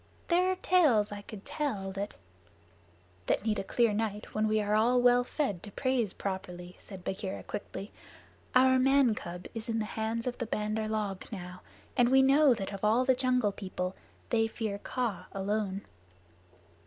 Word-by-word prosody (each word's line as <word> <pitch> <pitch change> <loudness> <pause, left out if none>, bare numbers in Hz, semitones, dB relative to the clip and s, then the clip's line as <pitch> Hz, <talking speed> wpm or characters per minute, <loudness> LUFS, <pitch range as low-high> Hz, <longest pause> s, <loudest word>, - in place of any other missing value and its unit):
There 360 +2 +4
are - - 0
tales 300 - +3
I 205 0 -6
could 205 -1 -10
tell 280 -10 -2
that 195 +1 -4 0.5
" 90 +1 -32
"That - - +1
need 215 -2 +1
a - - -2
clear 230 +2 +2
night 210 -1 -3
when 215 0 +1
we 215 0 +2
are 210 0 0
all 235 +4 +4
well 245 0 +5
fed 245 - -2
to 205 - -9
praise 250 -3 0
properly," 180 -2 -5
said 190 -3 -11
Bagheera 190 +1 -4
quickly. 205 -1 -6 0.6
"Our 260 0 +6
man 270 -2 +4
cub 180 -3 -7
is 225 0 -6
in 225 - 0
the 220 - 0
hands 220 +1 -2
of 250 -1 -3
the 235 - -2
Bandar 215 0 -1
log 210 -3 -3
now, 180 -3 -7 0.3
and 245 -2 +4
we 265 +1 +6
know 275 -1 +6
that 195 -1 -5
of 195 - -7
all 225 +4 +3
the 260 - +5
Jungle 250 -4 +2
People 185 -2 -4 0.4
they 225 -2 +3
fear 220 -3 -4
Kaa 205 -7 -3
alone." 200 0 -1
215 Hz, 180 wpm, -30 LUFS, 195-250 Hz, 0.6 s, Our